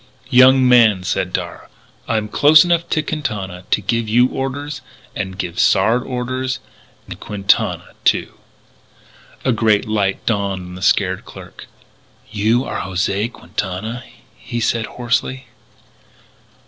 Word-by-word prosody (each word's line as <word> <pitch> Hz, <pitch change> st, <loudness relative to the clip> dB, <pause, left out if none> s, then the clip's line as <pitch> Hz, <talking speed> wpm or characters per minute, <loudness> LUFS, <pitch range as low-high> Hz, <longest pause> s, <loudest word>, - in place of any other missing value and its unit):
"Young 130 Hz, +1 st, +6 dB
man," 115 Hz, -6 st, +5 dB
said 90 Hz, -, -1 dB
Darragh, -, -, -5 dB, 0.4 s
"I'm 110 Hz, -2 st, -1 dB
close 150 Hz, +8 st, +6 dB
enough 170 Hz, -1 st, 0 dB
to 155 Hz, -, 0 dB
Quintana 105 Hz, -, -4 dB
to -, -, +2 dB
give 110 Hz, +3 st, -1 dB
you 120 Hz, +3 st, +4 dB
orders. 145 Hz, +2 st, -4 dB, 0.3 s
And 95 Hz, -2 st, -4 dB
give 90 Hz, -2 st, -4 dB
Sard 110 Hz, -, +3 dB
orders.... 130 Hz, +1 st, -3 dB, 0.5 s
And -, -, -9 dB
Quintana, 100 Hz, -1 st, 0 dB
too!" -, -, +1 dB, 1.1 s
A 130 Hz, -, +3 dB
great 110 Hz, -2 st, +2 dB
light 100 Hz, -3 st, -1 dB
dawned 100 Hz, -4 st, -1 dB
on 90 Hz, -, -10 dB
the 90 Hz, -, -9 dB
scared 95 Hz, -1 st, +1 dB
clerk: -, -, -12 dB, 0.6 s
"You 110 Hz, +4 st, +1 dB
are -, -, -4 dB
José 95 Hz, +5 st, -1 dB
Quintana!" 110 Hz, +6 st, -5 dB, 0.3 s
he 120 Hz, -1 st, -6 dB
said 115 Hz, -1 st, 0 dB
hoarsely. 125 Hz, +2 st, -2 dB
115 Hz, 125 wpm, -18 LUFS, 100-130 Hz, 1.1 s, Young